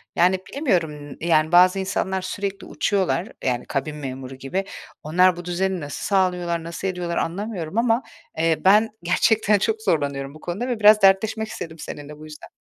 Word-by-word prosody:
Yani, 185 +2 +3
bilemiyorum, 160 - -1
yani, 160 -1 +2
bazı 180 +2 +6
insanlar 190 0 -1
sürekli 200 +1 -4
uçuyorlar, 190 -2 0 0.2
yani, 125 -2 -1
kabin 150 +2 -3
memuru 135 -2 -7
gibi. 160 +9 -3 0.4
Onlar 180 +3 +4
bu 175 - -9
düzeni 185 +1 -1
nasıl 145 -1 -6
sağlıyorlar, 180 -4 0
nasıl 170 +3 -5
ediyorlar 180 -2 -3
anlamıyorum 190 0 -3
ama, 230 +1 +2 0.3
eee, 160 0 +2
ben 210 +4 +6
gerçekten 210 +4 +3
çok 220 +2 -1
zorlanıyorum 140 -6 -1
bu 155 - -13
konuda 190 +10 -4
ve 245 -3 -2
biraz 215 0 +7
dertleşmek 210 +3 +3
istedim 165 -6 -8
seninle 150 0 -8
bu 155 - -10
yüzden. 150 -1 -11
180 Hz, 160 wpm, -23 LUFS, 155-200 Hz, 0.4 s, biraz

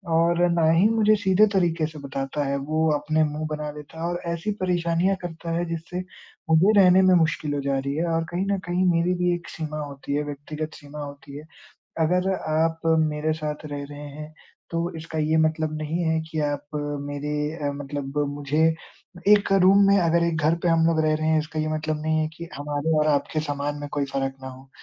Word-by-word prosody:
और 170 +1 +3
ना 165 -2 +3
ही 175 +5 +5
मुझे 215 -1 +4
सीधे 200 0 +4
तरीके 170 -4 +2
से 155 -1 -10
बताता 135 +1 -3
है। 140 0 0
वो 155 +3 0
अपने 155 +2 +1
मुँह 150 +1 -2
बना 150 0 -3
लेता 150 +2 -11
है 170 - -1
और 175 - -2
ऐसी 170 +6 -3
परेशानियाँ 175 +1 +1
करता 165 -1 -6
है, 175 - -1
जिससे 170 +2 -4 0.5
मुझे 175 +7 +5
रहने 185 -1 +7
में 185 -1 +5
मुश्किल 155 -3 +1
हो 145 - -1
जा 140 -1 0
रही 140 +1 -3
है 165 - 0
और 165 0 +1
कहीं 180 +3 -1
न 200 - +1
कहीं 180 +1 +1
मेरी 170 +2 +2
भी 175 - +3
एक 170 - -9
सीमा 155 -1 -5
होती 140 0 -6
है, 150 - 0
व्यक्तिगत 150 +2 -6
सीमा 145 0 -10
होती 140 0 -9
है। 150 - -9 0.6
अगर 180 +3 +1
आप 160 0 0 0.2
मेरे 155 0 0
साथ 150 0 -4
रह 145 -1 -5
रहे 145 - -9
हैं, 150 +2 -9 0.4
तो 170 +1 -1
इसका 160 0 -6
ये 155 +1 +1
मतलब 155 -1 0
नहीं 155 +3 -2
है 160 0 +1
कि 155 -1 -2
आप 145 0 -5 0.4
मेरे 145 +1 -4 0.4
अ, - - -2
मतलब 145 0 -5
मुझे 145 +3 +1 0.5
एक 205 -1 +5
रूम 195 +2 +6
में 200 0 +5
अगर 170 -1 +3
एक 170 -1 0
घर 160 - +4
पे 175 - +2
हम 165 -1 +3
लोग 165 -1 +2
रह 155 - +3
रहे 155 0 -2
हैं, 160 0 +4
इसका 155 +1 -4
ये 155 - -1
मतलब 155 0 -2
नहीं 155 0 +1
है 155 - +1
कि 170 - -7
एक 170 - -13
हमारे 145 +2 -2
और 150 - +2
आपके 150 +1 +1
सामान 145 -1 -3
में 145 - -5
कोई 145 -1 0
फ़र्क 135 -1 -1
ना 130 - -6
हो। 130 +1 -12
155 Hz, 220 wpm, -24 LUFS, 145-170 Hz, 0.6 s, रहने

